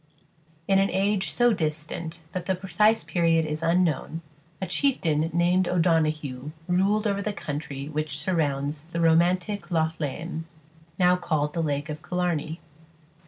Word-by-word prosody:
In 195 0 +4
an 195 0 +3
age 195 0 +1
so 240 -1 +3
distant 160 0 -3
that 180 -1 -5
the 190 - +2
precise 205 +4 +2
period 165 -2 +2
is 155 +1 -3
unknown, 165 -1 +1 0.4
a 190 - -2
chieftain 165 - +1
named 175 +2 +2
O'Donoghue 155 -5 +1 0.2
ruled 195 +4 +2
over 200 -1 0
the 210 - -1
country 145 -5 -5
which 150 -2 -3
surrounds 150 -3 -1
the 170 - -1
romantic 175 +5 +2
Lough 160 -2 +1
Lean, 160 +3 -4 0.5
now 180 -1 +5
called 150 -4 -1
the 170 - -1
lake 145 -2 -1
of 150 0 -6
Killarney. 175 -2 -2
165 Hz, 140 wpm, -26 LUFS, 155-185 Hz, 0.5 s, now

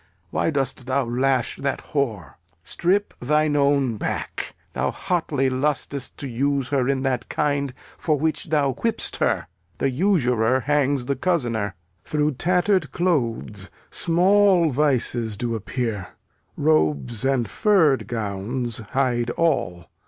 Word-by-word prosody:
Why - - +1
dost 135 -3 -2
thou 130 0 +1
lash 130 +3 0
that 140 -1 -3
whore? 115 - -1 0.3
Strip 190 - 0
thine 150 +3 +2
own 140 -5 +2
back. - - -4 0.2
Thou 70 +1 0
hotly 160 -7 -1
lusts 140 0 -1
to 140 - -8
use 135 +2 0
her 135 -3 +1
in 135 -1 0
that 130 -3 -1
kind 140 -2 0 0.3
For 155 -3 +1
which 160 +6 -1
thou 145 -5 +1
whip'st 225 - 0
her. - - +1 0.3
The 135 - 0
usurer 130 - +2
hangs 140 -1 +1
the 140 +2 0
cozener. 120 - -1 0.3
Through 150 0 0
tatter'd 180 +7 +1
clothes 115 - -1 0.2
small 180 -1 +4
vices 125 -6 +1
do 120 +2 -2
appear; 110 -3 -3 0.5
Robes 80 - +1
and 135 -4 +1
furr'd 170 - +3
gowns 115 +2 -3
hide 120 -3 +1
all. 90 - 0
135 Hz, 125 wpm, -23 LUFS, 120-150 Hz, 0.5 s, small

